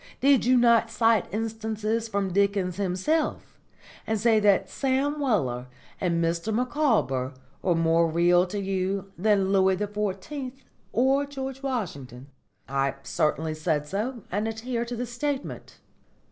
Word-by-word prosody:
Did 275 -3 +4
you 255 +1 +5
not 235 -1 +4
cite 225 -4 +2
instances 220 +1 -2
from 200 -3 -2
Dickens 200 -2 +1
himself 200 - -1 0.5
and 220 -1 0
say 225 0 +4
that 205 -2 +3
Sam 275 +2 0
Weller 130 - 0 0.3
and 170 -2 +1
Mr 170 +6 -1
Micawber 215 - +1 0.3
were 180 -2 +2
more 165 0 +3
real 175 +2 +3
to 205 +3 -4
you 195 0 -2
than 195 0 +2
Louis 190 -1 +4
XIV 210 +7 -3 0.4
or 270 +4 +2
George 270 -1 -6
Washington?" 145 - -4 0.4
"I 135 0 0
certainly 155 +2 0
said 155 -1 -1
so, 220 - -3
and 205 +4 -1
adhere 230 +2 -3
to 240 +1 -5
the 245 +2 -3
statement." 270 +4 -4
210 Hz, 130 wpm, -26 LUFS, 175-240 Hz, 0.5 s, you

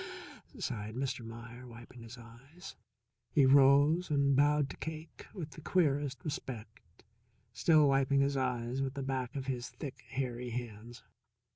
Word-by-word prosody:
sighed 110 - -4
Mr. 130 -2 -2
Meier, 115 +2 -9
wiping 120 +1 -12
his 115 +2 -10
eyes. 135 +11 -12 0.5
He 140 -3 +4
rose 140 +5 +5
and 140 -2 +3
bowed 145 +1 +4
to - - -10
Cake 160 0 -7
with 160 -6 -7
the 155 - -11
queerest 145 -6 0
respect, 115 -7 -6 0.7
still 150 +5 +5
wiping 135 0 +3
his 140 0 +1
eyes 125 -1 -1
with 135 0 -2
the 140 - -3
back 130 -1 -3
of 135 -1 -3
his 125 -2 -3
thick, 140 -5 -8
hairy 125 -2 -3
hands. 120 0 -7
135 Hz, 145 wpm, -33 LUFS, 120-145 Hz, 0.7 s, rose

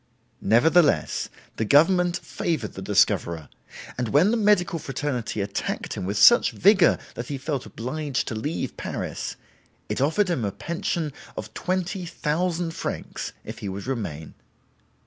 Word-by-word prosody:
Nevertheless 120 - +3 0.3
the - - 0
government 175 - +4
favored 155 - -3
the 95 - -7
discoverer, 85 -5 +1 0.5
and 125 - 0
when 160 - +4
the - - +2
medical 205 -6 +3
fraternity 135 -7 -3
attacked 100 0 -3
him 95 - -4
with 100 +2 -2
such 240 - +7
vigor 195 -2 +5 0.2
that 120 - -6
he 140 - -3
felt 135 -1 -3
obliged 140 +3 -3
to - - -3
leave 145 +9 -3
Paris, - - -4 0.5
it - - -1
offered 160 +9 +2
him 135 -9 -1
a 100 - -1
pension 160 - -3 0.2
of 110 +1 -6
20,000 175 -2 -1
francs - - -5
if - - -8
he 100 - -4
would 95 +1 -6
remain. 100 - -4
145 Hz, 140 wpm, -25 LUFS, 110-175 Hz, 0.5 s, such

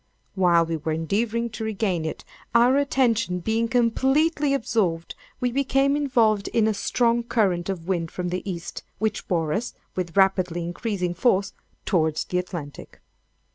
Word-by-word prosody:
While 175 -3 +4
we 165 0 -2
were 155 +1 -2
endeavoring 220 +8 -1
to 220 +1 -6
regain 200 -6 -1
it, 160 - -5 0.3
our 240 +3 +5
attention 235 -9 +1
being 220 +5 0
completely 270 +6 +2
absorbed, 205 -10 0 0.3
we 250 -2 0
became 275 +1 +2
involved 230 -8 +2
in 225 - +2
a 220 - +2
strong 235 +3 +1
current 195 -7 0
of 175 -3 -4
wind 170 -4 -1
from 180 +1 -4
the 180 +1 -2
East, 170 -2 -6 0.2
which 215 -1 -2
bore 165 -4 0
us, 235 +4 -3 0.2
with 180 0 -4
rapidly 185 -3 +2
increasing 180 0 -2
force, 195 0 +1 0.3
towards 160 -4 +1
the 180 - -1
Atlantic. 170 -6 -7
200 Hz, 150 wpm, -24 LUFS, 175-235 Hz, 0.3 s, our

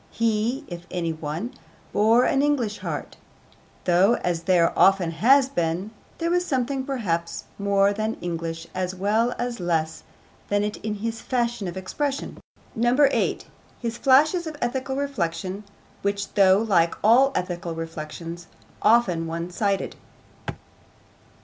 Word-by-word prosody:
He, 230 +4 0
if 175 0 -8
any 170 -3 -2
one, 160 - -5 0.4
bore 225 +4 +4
an 270 - +2
English 260 -8 0
heart, - - -5 0.7
though, 185 +6 +4
as 175 -2 0
there 175 -2 +3
often 190 -3 +4
has 255 - +4
been, 175 -3 -2 0.3
there 335 0 -1
was 355 0 +2
something 265 -3 -1
perhaps 175 -11 -2 0.2
more 200 0 +3
than 215 +2 -2
English 165 -1 -4
as 185 0 -2
well 215 +6 +1
as 240 -2 -3
less 160 -3 -1 0.5
than 205 0 +1
it 210 0 -3
in 215 -1 -4
his 225 +2 -4
fashion 240 -5 -1
of 175 +1 -6
expression. 275 +9 -3 0.4
8. 245 +5 +2 0.3
His 235 -1 -4
flashes 310 +6 +4
of 310 -2 -6
ethical 260 +2 -2
reflection, 195 -8 -3 0.4
which, 200 0 -2
though 190 -2 +6
like 190 -6 +2
all 255 +6 +6
ethical 175 -2 -3
reflections 165 +1 -7 0.3
often 205 -7 +3
one 170 +2 -4
sided. 200 +1 -1
205 Hz, 130 wpm, -24 LUFS, 175-245 Hz, 0.7 s, though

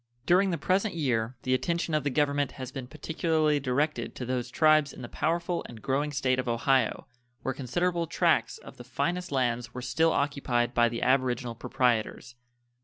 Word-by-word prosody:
During 185 +3 +4
the 170 - -1
present 190 +6 0
year 125 -6 0
the 130 - +1
attention 170 +4 -1
of 155 -2 +1
the 145 - 0
Government 145 0 +1
has 130 -1 -7
been 130 -2 -6
particularly 155 0 0
directed 145 +3 -1
to 125 - -5
those 125 -1 -2
tribes 155 0 +3
in - - -10
the - - -5
powerful 170 +4 -1
and 115 - -10
growing 140 +6 -1
State 130 -2 +1
of 130 - -3
Ohio, 120 +1 +1 0.4
where 130 - -1
considerable 170 +7 -1
tracts - - +1
of - - -13
the 125 - -9
finest 175 +8 -2
lands 120 -3 -1
were 125 - -4
still 165 +4 +2
occupied 130 -5 0
by 120 -1 +4
the 115 0 -4
aboriginal 125 -2 +1
proprietors. 125 0 -1
135 Hz, 180 wpm, -28 LUFS, 125-155 Hz, 0.4 s, During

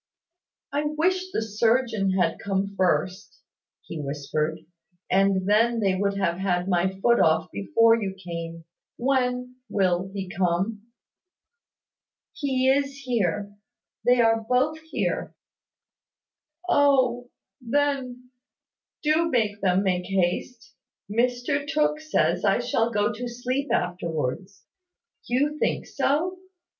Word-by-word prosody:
"I 290 +1 0
wish 365 +5 0
the 225 - -1
surgeon 220 -2 +1
had 180 -3 +1
come 200 0 -2
first," 185 +1 -1 0.4
he 160 - -6
whispered, 150 +2 -3 0.5
"and 195 0 +2
then 230 +3 +3
they 195 -3 +2
would 200 +1 0
have 175 -2 0
had 180 -2 0
my 190 +1 0
foot 235 +2 +4
off 160 0 +2
before 225 - +3
you 195 -2 -3
came. 170 -3 -7 0.3
When 250 -1 0
will 190 -2 +1
he 195 -1 -5
come?" 190 +5 -1 1.5
"He 260 -3 0
is 275 +1 +2
here, 205 -5 -1 0.5
they 245 +1 +4
are 225 -1 +3
both 275 +5 +2
here." 320 0 -3 1.3
"Oh, 260 -6 +3 0.3
then, 255 -1 -1 0.7
do 315 +2 +2
make 215 -6 0
them 190 0 +2
make 180 -2 0
haste. 195 +6 -2 0.4
Mr 245 +5 0
Tooke 300 0 +1
says 310 0 0
I - - +3
shall 230 +1 0
go 210 0 0
to 245 +3 -5
sleep 250 +4 -3
afterwards. 175 0 -2 0.6
You 290 +5 0
think - - 0
so? 350 +7 0
225 Hz, 115 wpm, -25 LUFS, 185-255 Hz, 1.5 s, foot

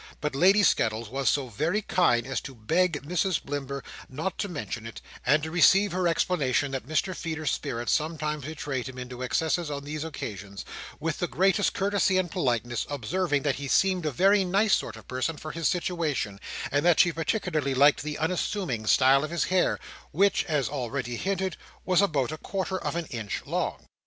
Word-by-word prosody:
But 150 -1 -2
Lady 190 +8 +5
Skettles 110 - +2
was 135 +1 +1
so 140 -3 +1
very 165 - -1
kind 120 -13 +2
as 135 - -2
to 135 - -9
beg 160 +7 +1
Mrs 180 +2 0
Blimber 140 -1 -5 0.3
not 160 +8 -4
to 205 - -1
mention 125 -8 -5
it; 115 - -8 0.2
and 150 +4 +3
to 160 - -4
receive 195 +4 +5
her 180 0 +1
explanation 145 -5 +1
that 135 -2 -4
Mr 155 +5 0
Feeder's 160 -4 -2
spirits 120 0 -2
sometimes 150 -2 -1
betrayed 140 -4 -4
him 130 - -10
into 125 0 -7
excesses 160 +5 0
on 140 -1 -4
these 150 +1 -4
occasions, 100 - -6 0.3
with - - -2
the - - 0
greatest 195 - +2
courtesy 200 -1 +2
and 185 -2 0
politeness; 120 - -1
observing, 145 +3 -1
that 145 -2 0
he 140 0 -5
seemed 185 +2 +2
a - - 0
very 195 +8 +4
nice 195 +3 +2
sort 115 - 0
of 110 - -13
person 130 +5 -2
for 155 - -6
his 165 0 -1
situation, 165 - -1 0.3
and 145 +1 +2
that 175 -1 +4
she 175 - +6
particularly 160 - -1
liked 140 +2 +5
the 150 0 -4
unassuming 160 - -1
style 135 +3 +5
of 155 - -3
his 170 0 0
hair—which 185 +1 +1
(as 150 -5 0
already 120 -3 -3
hinted) 190 +4 -2 0.3
was 185 0 +4
about 150 -10 +1
a 155 - -6
quarter 190 -1 -3
of - - -3
an 170 -1 -2
inch 110 -4 -4
long. - - -2
155 Hz, 185 wpm, -27 LUFS, 130-180 Hz, 0.3 s, she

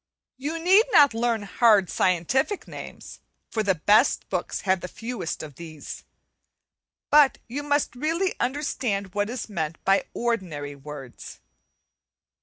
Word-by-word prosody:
You 295 +5 -3
need 375 +7 +5
not 285 -4 +6
learn 230 -1 0
hard 205 -1 +4
scientific 190 - 0
names, - - -10 0.3
for 220 - 0
the 195 -3 +1
best 210 - +3
books - - -3
have 190 -2 +1
the - - -5
fewest 225 -5 -5
of 145 -4 -10
these, 160 -3 -9 1.1
but 295 -2 +6
you 260 +5 -4
must 290 -4 0
really 330 +8 0
understand 245 -8 -2
what 205 +1 -1
is 245 0 -5
meant 165 -6 -3
by 195 +1 +3
ordinary 180 -12 -2
words. 140 -2 -10
220 Hz, 130 wpm, -25 LUFS, 175-270 Hz, 1.1 s, not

